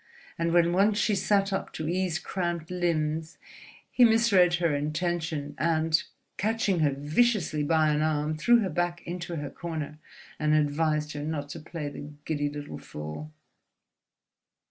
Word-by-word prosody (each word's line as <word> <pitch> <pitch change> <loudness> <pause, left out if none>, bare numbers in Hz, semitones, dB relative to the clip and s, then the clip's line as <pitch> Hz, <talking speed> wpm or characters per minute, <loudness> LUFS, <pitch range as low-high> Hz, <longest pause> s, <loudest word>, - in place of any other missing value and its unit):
And 170 0 +1
when 170 0 +4
once 205 +3 +3
she 215 - +2
sat 195 0 +2
up 195 - -2
to 155 - -4
ease 180 -1 0
cramped 175 -3 -3
limbs, 160 -3 -1 0.5
he 250 - +4
misread 220 -6 +5
her 170 -4 +1
intention 155 0 -2
and, 160 -1 +2 0.4
catching 210 -3 +1
her 155 -2 +4
viciously 155 - +1
by 155 +1 +3
an 150 0 +1
arm, 155 0 0
threw 235 +9 +4
her 195 - -1
back 175 +2 -2
into 175 0 -5
her 145 -3 -4
corner 155 -3 -5 0.4
and 150 0 +3
advised 150 0 +1
her 145 - -5
not 150 -2 -3
to 165 - -6
play 160 -1 -6
the 145 +1 -8
giddy 145 -2 -1
little 145 0 -7
fool. 75 - -7
160 Hz, 150 wpm, -28 LUFS, 150-180 Hz, 0.5 s, misread